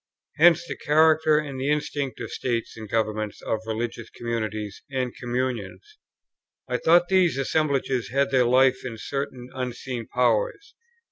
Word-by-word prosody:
Hence 170 Hz, +1 st, +6 dB
the -, -, -5 dB
character 155 Hz, 0 st, +4 dB
and 140 Hz, -4 st, -3 dB
the 135 Hz, -, 0 dB
instinct 145 Hz, -2 st, -2 dB
of -, -, -6 dB
states 120 Hz, -3 st, -2 dB
and 110 Hz, -2 st, -9 dB
governments, 110 Hz, -1 st, -1 dB
of 110 Hz, -, -1 dB
religious 115 Hz, +1 st, -4 dB
communities 110 Hz, -3 st, -4 dB
and 130 Hz, -2 st, -2 dB
communions. 120 Hz, -7 st, -4 dB, 0.7 s
I 125 Hz, -1 st, 0 dB
thought 175 Hz, +6 st, +4 dB
these 185 Hz, -6 st, +3 dB
assemblages 135 Hz, -4 st, 0 dB
had 140 Hz, +2 st, +1 dB
their 130 Hz, -2 st, +4 dB
life 130 Hz, +2 st, +4 dB
in 115 Hz, -3 st, -6 dB
certain 130 Hz, 0 st, -5 dB
unseen 125 Hz, -2 st, -5 dB
Powers. 125 Hz, -, 0 dB
130 Hz, 140 wpm, -25 LUFS, 115-145 Hz, 0.7 s, Hence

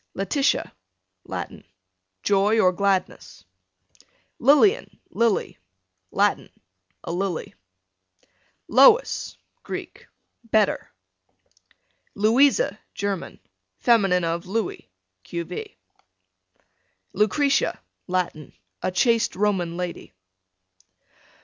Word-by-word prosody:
Letitia, 275 Hz, +9 st, 0 dB, 0.5 s
Latin, -, -, -6 dB, 0.6 s
joy 205 Hz, +2 st, +3 dB
or 185 Hz, -4 st, +5 dB
gladness. 185 Hz, -, -2 dB, 0.9 s
Lilian, 300 Hz, -, +3 dB
Lily, 230 Hz, -3 st, 0 dB, 0.5 s
Latin, -, -, +1 dB, 0.5 s
a -, -, -5 dB
lily. 180 Hz, -1 st, -3 dB, 1.1 s
Lois, 275 Hz, -, +4 dB, 0.2 s
Greek, -, -, -8 dB, 0.4 s
better. 220 Hz, -2 st, +1 dB, 1.3 s
Louisa, 260 Hz, -, +3 dB, 0.2 s
German. 200 Hz, -3 st, -4 dB, 0.4 s
fem. 230 Hz, -4 st, +4 dB, 0.2 s
of 170 Hz, +2 st, -2 dB
Louis, 210 Hz, -, -3 dB, 0.3 s
q.v. 295 Hz, -, -6 dB, 1.4 s
Lucretia, 275 Hz, +7 st, +1 dB, 0.3 s
Latin, 180 Hz, -4 st, -3 dB, 0.3 s
a -, -, 0 dB
chaste 230 Hz, +5 st, +2 dB
Roman 185 Hz, -4 st, 0 dB
lady. 180 Hz, -, -6 dB
205 Hz, 70 wpm, -24 LUFS, 180-240 Hz, 1.4 s, or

